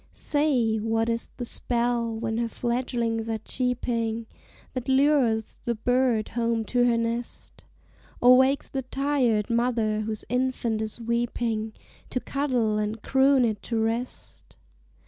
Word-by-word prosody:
Say, 265 -7 +1
what 225 +1 0
is 230 0 -1
the 245 - -4
spell, 235 -1 0
when 225 0 -2
her 235 - 0
fledgelings 235 -1 -2
are 225 - 0
cheeping, 230 -1 -2 0.5
That 255 0 -4
lures 265 -5 +2
the 235 - -1
bird 245 -1 +1
home 230 -1 -1
to 245 -1 +4
her 235 -1 +3
nest? 230 +1 -3 0.6
Or 250 +1 +7
wakes 265 +2 +3
the 270 - -3
tired 255 -5 0
mother, 230 -2 +1
whose 215 0 -4
infant 250 -3 -1
is 220 +1 -4
weeping, 230 -1 -1 0.4
To 250 - -1
cuddle 250 -7 0
and 210 +1 -3
croon 265 -1 +4
it 215 -3 -2
to 230 - -3
rest? 230 +3 -4
235 Hz, 135 wpm, -26 LUFS, 225-250 Hz, 0.6 s, Or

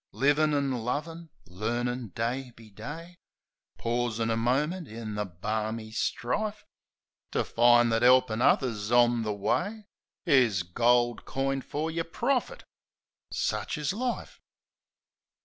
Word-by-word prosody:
Livin' 145 +7 +3
an' 140 -1 +1
lovin'; 165 +6 -4 0.2
learnin' 120 +6 -2
day 125 +3 -2
be 110 -2 -15
day; 160 - -8 0.6
Pausin' 115 -1 -1
a - - +1
minute 145 +9 0
in 110 -1 -6
the 105 0 -2
barmy 110 +5 -4
strife 210 - -2 0.7
To - - +1
find 120 0 +4
that 115 - +2
'elpin' 125 -2 +4
others 115 -5 +2
on 120 -1 +4
the 110 -1 -2
way 175 - -1 0.4
Is 115 -9 +4
gold 120 +6 +2
coined 135 0 -2
fer 155 +3 -3
your 165 0 -1
profit 260 - -1 0.4
— - - -64
sich - - -2
is 150 +3 -1
life. 245 +3 -4
120 Hz, 125 wpm, -28 LUFS, 115-150 Hz, 0.7 s, find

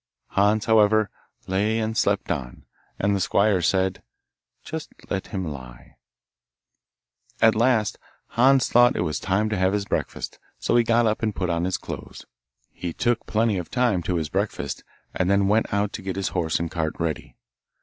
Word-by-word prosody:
Hans, 105 +2 +2
however, 110 -2 +4 0.3
lay 105 +4 +1
and 110 0 -1
slept 100 -4 +1
on, 65 -7 -5 0.3
and 100 +1 +1
the - - 0
squire 100 +1 +2
said, 95 +2 +1 0.6
'Just 160 0 -6 0.2
let 95 -1 -2
him 95 -3 -4
lie.' 65 -6 -9 1.4
At 110 -1 +6
last, 110 -2 +2 0.3
Hans 130 +2 +4
thought 120 +1 +5
it - - 0
was 75 -4 -2
time 105 +3 +1
to 105 - -1
have 95 +1 +2
his 105 -1 -1
breakfast, - - -3 0.2
so - - 0
he 120 - +5
got 115 +1 +3
up 110 -1 0
and 110 -3 -1
put 90 -2 -1
on 85 +1 0
his 95 0 0
clothes. - - -8 0.5
He 85 -2 -5
took 120 +4 0
plenty 110 -3 +1
of 90 - -7
time 120 -8 +1
to 90 +1 -2
his 80 -3 -1
breakfast, - - -2 0.3
and 90 0 0
then 100 0 +3
went 110 +2 +2
out 100 0 0
to - - -5
get 95 -1 -4
his 95 -1 -1
horse 85 -4 -1
and 85 -1 -3
cart 80 -2 -2
ready. 80 -4 -3
100 Hz, 180 wpm, -24 LUFS, 90-110 Hz, 1.4 s, At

